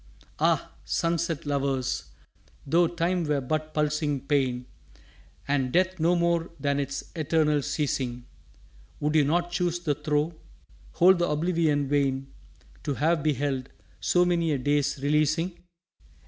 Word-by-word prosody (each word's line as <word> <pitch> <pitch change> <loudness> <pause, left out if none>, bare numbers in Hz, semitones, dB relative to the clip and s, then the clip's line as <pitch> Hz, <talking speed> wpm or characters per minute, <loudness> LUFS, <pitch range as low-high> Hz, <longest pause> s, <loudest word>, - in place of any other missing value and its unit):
Ah, - - +1
sunset 165 -2 -1
lovers, 135 -2 -1 0.6
though 170 +4 +3
Time 175 +1 0
were 150 -2 +1
but 155 +4 -2
pulsing 150 -1 0
pain, 130 -4 0 0.8
And 135 -3 +1
death 185 +2 +1
no 170 +3 +3
more 170 -1 +1
than 140 0 0
its 140 0 -4
eternal 155 -2 +2
ceasing, 135 -4 -2 0.7
Would 150 +1 0
you 155 -2 +5
not 175 +4 0
choose 175 -1 0
the 165 -4 0
throe, 150 +2 -1 0.6
Hold 185 +1 +5
the 175 - +1
oblivion 150 -2 +1
vain, 135 -1 0 0.5
To 145 -3 -2
have 160 +3 +2
beheld 140 -3 -1 0.3
so 175 - +3
many 170 -2 +1
a - - +1
day's 145 +2 +1
releasing? 155 +4 +1
150 Hz, 130 wpm, -27 LUFS, 140-170 Hz, 0.8 s, you